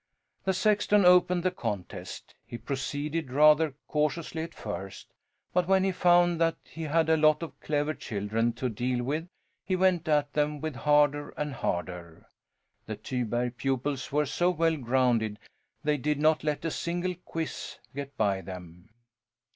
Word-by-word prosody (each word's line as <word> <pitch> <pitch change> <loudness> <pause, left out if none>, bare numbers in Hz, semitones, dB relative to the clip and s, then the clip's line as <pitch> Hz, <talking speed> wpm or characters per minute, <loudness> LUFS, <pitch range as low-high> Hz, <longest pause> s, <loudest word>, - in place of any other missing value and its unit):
The 190 - +2
sexton 205 0 +3
opened 180 0 +5
the 185 - +2
contest. 100 - -6
He 120 - -8
proceeded 145 +4 -3
rather 150 +1 +5
cautiously 150 +2 -1
at 165 0 -7
first, 95 -2 -7 0.4
but 180 -1 +2
when 190 0 +4
he 195 - +2
found 175 -1 +3
that 165 0 +3
he 165 - -10
had 160 +1 +2
a 160 - +4
lot 155 0 +4
of 165 - -8
clever 150 0 -1
children 110 -1 -1
to 130 - -2
deal 120 +2 -1
with 155 +6 -2 0.4
he 185 +1 0
went 180 -3 +2
at 150 -2 +2
them 150 0 0
harder 145 +2 +2
and 150 -1 -2
harder. 90 -6 -4 0.6
The - - -4
Tyberg 120 0 -2
pupils 135 0 -2
were 150 +1 +2
so 175 +6 +1
well 165 -2 +2
grounded 120 -5 +1 0.5
they 150 0 +2
did 150 +2 -1
not 155 0 +3
let 150 +1 -2
a 165 - 0
single 175 +3 -2
quizz 165 -1 -5 0.2
get 140 0 -7
by 100 -3 +1
them. 90 0 -10
150 Hz, 155 wpm, -28 LUFS, 125-165 Hz, 0.6 s, opened